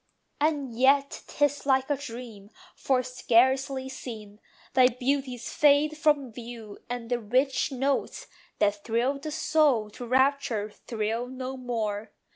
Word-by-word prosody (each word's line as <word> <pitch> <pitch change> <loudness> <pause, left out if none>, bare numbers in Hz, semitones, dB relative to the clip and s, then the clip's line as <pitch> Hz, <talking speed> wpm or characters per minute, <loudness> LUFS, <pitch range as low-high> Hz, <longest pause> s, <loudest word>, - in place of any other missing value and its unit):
And 290 -4 0
yet 275 +4 +3
'tis 290 -1 0
like 265 -1 +3
a - - +3
dream: 230 -6 -9 0.3
for, 255 -2 +1
scarcely 260 +2 +2
seen, 215 -6 -8 0.3
Thy 255 -1 +6
beauties 255 -1 -2
fade 295 +1 +4
from 295 -5 +1
view; 230 -3 -9
and 245 -1 -5
the 245 - +1
rich 255 +6 +1
notes, 270 +1 -1 0.3
That 205 -1 +1
thrilled 245 +5 0
the 310 - -5
soul 290 -8 +2
to 245 +3 -8
rapture, 255 -5 +1
thrill 225 +2 -3
no 260 +1 -6
more. 225 -5 -3
255 Hz, 130 wpm, -27 LUFS, 230-275 Hz, 0.3 s, Thy